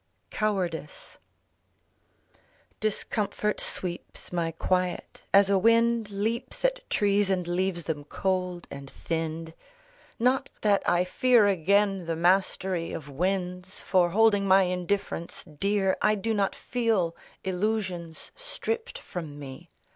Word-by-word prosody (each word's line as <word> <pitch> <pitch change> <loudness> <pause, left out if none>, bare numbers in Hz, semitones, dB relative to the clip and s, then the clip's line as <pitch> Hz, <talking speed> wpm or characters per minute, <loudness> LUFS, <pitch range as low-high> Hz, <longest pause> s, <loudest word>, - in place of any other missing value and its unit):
COWARDICE 180 -8 -3 1.6
Discomfort 210 0 -1
sweeps 180 0 -5
my 170 -2 0
quiet, 180 +2 -1
as 200 0 +6
a 195 -1 +3
wind 230 +1 +3
Leaps 220 - -2
at - - 0
trees 205 -1 +2
and 180 -3 0
leaves 175 0 -1
them 150 -3 -4
cold 180 +1 -2
and 140 0 -8
thinned. 160 +1 -4 0.6
Not 255 +3 +2
that 205 -2 +3
I 175 +1 +3
fear 240 +4 +4
again 195 0 +2
the 165 - 0
mastery 180 0 +1
Of 150 -2 -6
winds, 180 +4 -2
for 180 -2 +3
holding 205 0 +4
my 190 0 +6
indifference 180 -1 -2
dear 190 +4 0
I 210 0 +4
do 220 +2 -1
not 200 -2 0
feel 220 -9 0 0.3
illusions 185 -4 -2
stripped 475 -2 -4
from 155 -5 -7
me. 145 +4 -9
190 Hz, 115 wpm, -27 LUFS, 175-210 Hz, 1.6 s, as